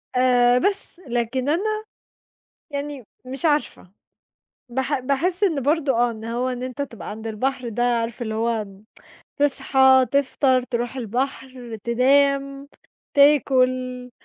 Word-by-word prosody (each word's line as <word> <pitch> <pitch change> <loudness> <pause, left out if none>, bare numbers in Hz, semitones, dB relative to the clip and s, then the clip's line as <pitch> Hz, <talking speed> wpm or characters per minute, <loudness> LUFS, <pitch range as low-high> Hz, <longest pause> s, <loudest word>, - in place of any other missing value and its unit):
آآ 250 -1 +4
بس، 395 0 -1
لكن 240 +3 -1
أنا 430 +7 -1 0.9
يعني 285 -2 -5 0.2
مش 265 +4 -5
عارفة، 295 - -1 0.8
باح 265 +3 -1
باحس 315 +9 0
إن 310 -8 0
برضه، 290 0 +1
آه، 240 0 +2
إن 220 -1 -9
هو 240 +3 -2
إن 250 -1 -4
أنت 255 +2 -4
تبقى 230 -8 -8
عَند 220 +2 -8
البحر 250 +3 -2
ده، 235 +2 -2
عارف 235 -1 -1
اللي 220 -2 -3
هو 225 -1 -1 0.7
تصحى، 265 -2 +4
تفطَر، 270 -2 +2
ترُوح 245 +1 -4
البحر، 250 0 -4
تنام، 275 +3 +2 0.5
تاكل، 255 -3 +3
255 Hz, 120 wpm, -22 LUFS, 240-280 Hz, 0.9 s, آآ